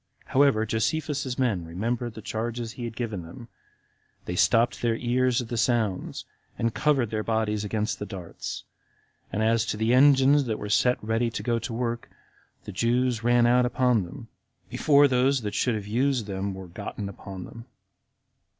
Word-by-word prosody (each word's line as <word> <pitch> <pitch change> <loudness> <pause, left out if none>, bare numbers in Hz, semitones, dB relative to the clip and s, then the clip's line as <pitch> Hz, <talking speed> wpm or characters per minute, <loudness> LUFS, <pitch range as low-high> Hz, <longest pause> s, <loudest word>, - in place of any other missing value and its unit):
However, 130 -5 +3
Josephus's 130 +4 -1
men 115 -10 0
remembered 115 +8 -3
the 110 - -9
charges 115 +1 -3
he 120 0 -6
had 115 -1 -6
given 110 -6 -3
them, 115 +8 -11 0.8
they - - -4
stopped 120 +1 +3
their 115 -1 +1
ears 125 +1 +1
at 115 - -11
the 120 - -3
sounds, 110 -4 0 0.3
and 115 -1 0
covered 140 -7 +1
their 110 -1 -1
bodies 110 -1 -1
against 105 +2 -2
the 105 - -5
darts; 90 -5 -7 0.7
and 110 - -1
as 115 0 +3
to 105 - -2
the 110 +2 +2
engines 140 +1 +5
that 110 -3 -2
were 105 - -6
set 125 +4 +3
ready 115 +2 0
to 115 - -5
go 120 -1 +1
to 120 +2 -5
work, 120 0 -3 0.5
the - - -7
Jews 120 +3 +1
ran 120 0 +4
out 125 +1 +4
upon 125 -2 +2
them, 115 +8 -10 0.4
before 145 -1 +5
those 130 +1 +2
that 105 -2 -4
should 125 -3 +1
have 105 -2 -4
used 125 +2 0
them 100 -1 -3
were 95 -1 -8
gotten 100 +3 -6
upon 95 -1 -8
them. 115 0 -11
115 Hz, 175 wpm, -26 LUFS, 105-125 Hz, 0.8 s, engines